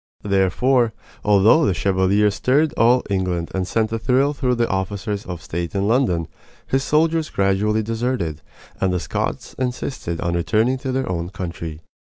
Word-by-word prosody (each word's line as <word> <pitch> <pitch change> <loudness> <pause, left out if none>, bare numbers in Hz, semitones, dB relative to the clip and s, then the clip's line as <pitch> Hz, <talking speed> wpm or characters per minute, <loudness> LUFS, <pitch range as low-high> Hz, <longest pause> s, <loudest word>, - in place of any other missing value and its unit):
Therefore, 110 +5 +2 0.3
although 105 +9 +5
the 95 - +2
Chevalier 100 +2 +2
stirred 140 +9 +1
all 120 +2 +4
England 90 -3 -1
and 95 -1 -1
sent 110 +1 0
a 115 - -1
thrill 135 +5 +2
through 125 -3 0
the 120 -1 +1
officers 100 +1 -3
of 90 -2 -6
state 85 +1 -4
in 100 +1 +1
London, 105 - +1 0.4
his 135 0 0
soldiers 160 +1 +1
gradually 105 +2 +1
deserted, 115 - -2 0.4
and 95 - +1
the 90 - 0
Scots - - -3
insisted 125 -8 -3
on 85 - -1
returning 110 +9 +1
to 130 -1 -3
their 130 0 -1
own 85 -1 -3
country. 85 -4 -6
105 Hz, 160 wpm, -21 LUFS, 90-125 Hz, 0.4 s, although